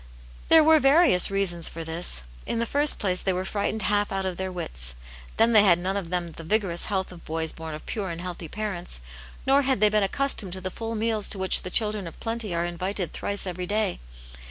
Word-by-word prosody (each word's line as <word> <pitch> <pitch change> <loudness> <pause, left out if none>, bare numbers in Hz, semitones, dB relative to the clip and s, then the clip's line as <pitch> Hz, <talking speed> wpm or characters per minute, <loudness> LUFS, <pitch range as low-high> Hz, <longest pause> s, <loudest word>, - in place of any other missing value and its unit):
There 320 -1 +8
were 315 0 +6
various 275 - +5
reasons 190 -4 0
for 165 - -7
this. 160 - -2 0.2
In - - -1
the 235 - 0
first 290 +5 +2
place 185 -3 -1
they 190 - 0
were 185 +1 -3
frightened 205 +1 -2
half 205 0 +1
but 195 0 -3
of 185 -2 -3
their 190 0 -3
wits. - - 0 0.4
Then 230 +1 +4
they 215 - +9
had 185 -4 +5
none 185 +2 -2
of 195 -4 -3
them 175 -2 -3
th6 165 - -10
vigorous 190 -4 0
health 190 -3 -2
of 175 -2 -12
boys 160 0 -3
born 160 -1 -7
of 155 - -11
pure 200 -4 -4
and 165 -1 -5
health)^ 175 -2 -7
parents, 190 - -4 0.4
nor 275 +1 +4
had 265 -4 +1
they 210 0 +5
been 210 0 +2
accustomed 205 -2 -1
to 190 - -6
the 185 0 -4
full 225 +2 -5
/neals 220 -1 0
to - - +1
which 190 0 +6
the 185 - -5
children 210 -2 +1
of 165 - -11
plenty 225 -3 -4
are 170 0 -1
invited 180 0 -3
thrice 200 -1 -1
every 180 -1 -4
day. 210 -1 0
190 Hz, 230 wpm, -25 LUFS, 175-215 Hz, 0.4 s, they